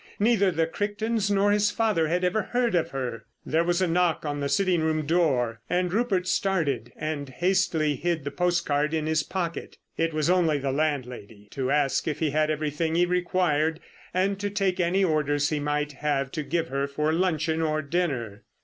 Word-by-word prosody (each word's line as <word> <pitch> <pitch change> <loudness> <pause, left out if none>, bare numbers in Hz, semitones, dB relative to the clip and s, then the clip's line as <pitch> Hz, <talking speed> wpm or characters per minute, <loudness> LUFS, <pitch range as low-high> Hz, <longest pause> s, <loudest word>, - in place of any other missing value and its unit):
Neither 205 -2 +3
the 165 -2 +1
Crichtons 205 +4 -1
nor 200 0 +3
his 210 0 +3
father 205 -7 +1
had 175 +3 0
ever 180 +4 +1
heard 240 +1 0
of 170 -2 +1
her. 125 -4 -4 0.2
There 160 +2 +1
was 175 +2 +1
a - - +2
knock 170 -1 +1
on 145 -1 -2
the 140 0 -1
sitting 180 +2 +2
room 155 -1 0
door, 135 -9 +1
and 180 0 0
Rupert 200 -5 +1
started 145 - 0
and 150 -2 -4
hastily 165 0 +1
hid 170 -2 -1
the 145 - -4
postcard 160 -3 0
in 155 -1 -1
his 155 0 +1
pocket. 170 0 -4 0.2
It 165 0 +1
was 155 -1 0
only 170 -4 +3
the 135 -1 -2
landlady 125 -8 -3
to 130 -1 -2
ask 140 -1 +1
if 150 - -1
he 155 -3 0
had 155 +1 +1
everything 155 +1 -1
he 175 +1 +4
required 175 -3 +1 0.3
and 195 +2 0
to 205 0 -2
take 195 -2 0
any 180 +3 +2
orders 145 -4 +1
he 150 - -1
might 150 0 -1
have 140 -1 -1
to 155 - -3
give 165 +2 -2
her 140 +1 -1
for 150 +3 -1
luncheon 160 -2 0
or 155 -1 0
dinner. 140 - -2
160 Hz, 190 wpm, -26 LUFS, 145-180 Hz, 0.3 s, he